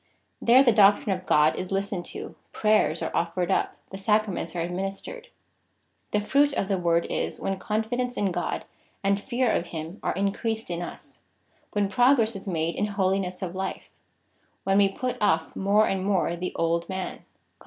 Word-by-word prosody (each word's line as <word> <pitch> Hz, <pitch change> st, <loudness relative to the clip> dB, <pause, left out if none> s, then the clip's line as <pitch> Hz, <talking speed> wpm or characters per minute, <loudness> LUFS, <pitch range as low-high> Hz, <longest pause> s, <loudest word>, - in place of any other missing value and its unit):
There 250 Hz, +3 st, +6 dB
the 245 Hz, -, +5 dB
doctrine 205 Hz, -1 st, +5 dB
of 185 Hz, 0 st, -10 dB
God 150 Hz, +1 st, +4 dB
is 185 Hz, -, -5 dB
listened 195 Hz, -2 st, -2 dB
to, -, -, -7 dB, 0.2 s
prayers 215 Hz, 0 st, +2 dB
are -, -, -3 dB
offered 175 Hz, +2 st, 0 dB
up, -, -, +1 dB, 0.2 s
the 190 Hz, -, -7 dB
Sacraments 210 Hz, -4 st, 0 dB
are -, -, -2 dB
administered. 195 Hz, -, -4 dB, 0.8 s
The 210 Hz, -, +1 dB
fruit 280 Hz, +7 st, +3 dB
of 195 Hz, -, -1 dB
the 195 Hz, -2 st, +1 dB
Word 170 Hz, -1 st, +2 dB
is, -, -, -2 dB
when 195 Hz, -1 st, -2 dB
confidence 245 Hz, +4 st, -2 dB
in 200 Hz, -2 st, +1 dB
God 175 Hz, 0 st, -3 dB, 0.4 s
and 200 Hz, 0 st, +2 dB
fear 245 Hz, -1 st, 0 dB
of 175 Hz, -, 0 dB
him 165 Hz, +4 st, -7 dB
are -, -, -1 dB
increased 210 Hz, +2 st, -2 dB
in 170 Hz, 0 st, -3 dB
us 175 Hz, -, -8 dB, 0.3 s
— -, -, -38 dB
when 205 Hz, -1 st, +1 dB
progress 235 Hz, +2 st, +3 dB
is 195 Hz, +1 st, -7 dB
made 165 Hz, -2 st, -1 dB
in 210 Hz, -, -1 dB
holiness 190 Hz, -2 st, -1 dB
of 180 Hz, -2 st, -4 dB
life 190 Hz, 0 st, -5 dB, 0.4 s
— -, -, -41 dB
when 195 Hz, +1 st, +3 dB
we 200 Hz, -1 st, +5 dB
put 250 Hz, +5 st, -3 dB
off 160 Hz, -6 st, +1 dB
more 205 Hz, +2 st, +3 dB
and 190 Hz, -1 st, -1 dB
more 190 Hz, -3 st, +1 dB
the 180 Hz, +1 st, -5 dB
old 170 Hz, 0 st, 0 dB
man, 190 Hz, -1 st, -4 dB
(Col. -, -, -26 dB
195 Hz, 185 wpm, -26 LUFS, 180-215 Hz, 0.8 s, There